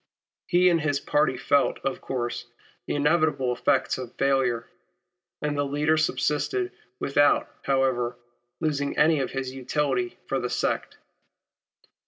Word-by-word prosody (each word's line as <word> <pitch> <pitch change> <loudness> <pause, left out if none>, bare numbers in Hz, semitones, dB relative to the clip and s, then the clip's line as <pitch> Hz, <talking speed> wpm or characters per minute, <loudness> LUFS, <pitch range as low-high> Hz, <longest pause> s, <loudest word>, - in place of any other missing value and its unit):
He 180 0 +4
and 170 -2 +3
his 145 -2 0
party 145 -3 +1
felt, 140 +2 +2
of 135 -1 -2
course, 120 -2 -3 0.4
the - - -1
inevitable 145 -4 +2
effects 130 +1 +1
of 125 -2 -7
failure; 130 -4 +1 0.8
and 150 0 0
the 145 - +1
leader 145 +2 +1
subsided 160 - 0 0.3
without, 145 +1 +3 0.2
however, 130 -3 +1 0.4
losing 145 -3 -1
any 155 0 +4
of 135 - -1
his 135 -1 -4
utility 130 -2 -1
for 135 - -1
the 125 - -2
sect. - - -1
140 Hz, 130 wpm, -26 LUFS, 130-150 Hz, 0.8 s, He